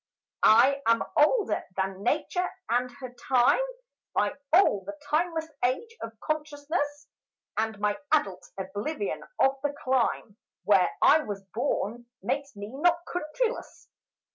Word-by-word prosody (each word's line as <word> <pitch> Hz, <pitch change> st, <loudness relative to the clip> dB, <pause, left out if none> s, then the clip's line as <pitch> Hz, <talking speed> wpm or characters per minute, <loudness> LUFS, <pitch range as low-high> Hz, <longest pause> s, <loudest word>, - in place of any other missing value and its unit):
I 260 Hz, +6 st, +6 dB
am 230 Hz, 0 st, +4 dB
older 395 Hz, +9 st, +3 dB
than 190 Hz, 0 st, -2 dB
Nature 335 Hz, -, 0 dB, 0.2 s
and 245 Hz, +2 st, +1 dB
her 255 Hz, -1 st, -9 dB
Time 250 Hz, -, +3 dB, 0.5 s
By -, -, +2 dB, 0.2 s
all 325 Hz, -, +5 dB
the 305 Hz, 0 st, -7 dB
timeless 320 Hz, +1 st, 0 dB, 0.2 s
age 450 Hz, -, 0 dB
of 225 Hz, -1 st, -7 dB
Consciousness, 290 Hz, -1 st, -3 dB, 0.5 s
And 220 Hz, -1 st, -1 dB
my 205 Hz, 0 st, 0 dB
adult 200 Hz, -12 st, +1 dB
oblivion 205 Hz, -, -3 dB, 0.2 s
of 270 Hz, +1 st, +4 dB
the 290 Hz, 0 st, -1 dB
clime 245 Hz, -4 st, 0 dB, 0.3 s
Where 195 Hz, -3 st, +4 dB
I 310 Hz, -, +7 dB
was 205 Hz, -9 st, -5 dB
born 235 Hz, -1 st, -2 dB, 0.2 s
makes 280 Hz, -2 st, -2 dB
me 205 Hz, +1 st, -7 dB
not 340 Hz, +6 st, +2 dB
countryless. 360 Hz, +9 st, -3 dB
275 Hz, 125 wpm, -28 LUFS, 220-310 Hz, 0.5 s, I